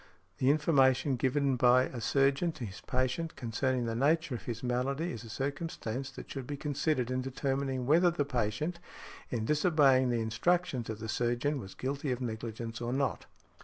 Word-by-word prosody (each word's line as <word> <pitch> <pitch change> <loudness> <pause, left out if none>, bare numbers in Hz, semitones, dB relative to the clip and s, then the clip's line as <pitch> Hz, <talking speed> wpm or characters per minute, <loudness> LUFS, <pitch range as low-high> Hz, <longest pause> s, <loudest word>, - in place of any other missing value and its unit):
The 130 - +3
information 140 -3 +3
given 135 +1 +1
by 125 +1 +5
a 125 -2 -5
surgeon 140 +7 +2
to 125 - -6
his 95 -2 -8
patient 130 +6 -1
concerning 125 +1 -1
the 115 - -2
nature 145 +4 +2
of 120 - -6
his 115 0 -5
malady 135 +6 -1
is 115 -1 -7
a 115 - -10
circumstance 135 -1 -3
that 130 - -10
should 135 -3 -5
be 145 - -4
considered 140 -3 -1
in 130 0 0
determining 135 0 -2
whether 170 +6 +5
the 165 -4 -1
patient, 135 +7 -2 0.5
in 115 -3 -2
disobeying 145 -4 +4
the 120 -1 +1
instructions 130 +3 0
of 110 - -3
the 110 +1 -6
surgeon, 120 +6 0
was 95 -5 -9
guilty 140 +1 -2
of 125 - -1
negligence 115 -1 -5
or 120 0 -2
not. 135 -2 -1
130 Hz, 175 wpm, -31 LUFS, 120-145 Hz, 0.5 s, by